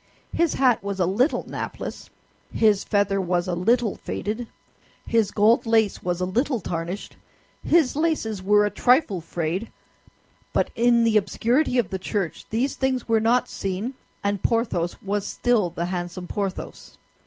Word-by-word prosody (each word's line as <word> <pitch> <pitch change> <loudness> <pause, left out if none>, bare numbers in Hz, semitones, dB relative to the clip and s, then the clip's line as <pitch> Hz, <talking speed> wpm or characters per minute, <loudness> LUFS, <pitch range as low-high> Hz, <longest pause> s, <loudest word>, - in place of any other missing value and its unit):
His 340 -1 +1
hat 250 -6 +3
was 200 -1 -4
a 180 - +3
little 230 - +1
napless, - - -6 0.4
his 210 -3 +3
feather 200 -1 +1
was 175 -1 0
a 180 - -1
little 225 +5 +1
faded, 220 +3 -4 0.6
his 225 -3 +2
gold 220 +3 +3
lace 220 -3 +2
was 180 -1 -2
a 180 - 0
little 245 +7 0
tarnished, 175 +2 -5 0.5
his 315 -6 +3
laces 295 - 0
were 210 +2 +4
a 205 - -1
trifle 245 - +2
frayed; 170 +5 -3 0.8
but - - +1
in 235 0 +3
the 225 -2 +4
obscurity 240 +7 +1
of 230 -6 +1
the 190 - -3
church 190 -3 -3
these 250 +5 0
things 260 -2 -1
were 225 -1 +3
not 235 +3 +2
seen, 195 +6 -3 0.3
and 200 -1 -1
Porthos 210 -7 0
was 200 0 -1
still 230 -7 +1
the 170 0 -3
handsome 180 0 -4
Porthos. 195 -1 -5
210 Hz, 155 wpm, -24 LUFS, 185-240 Hz, 0.8 s, were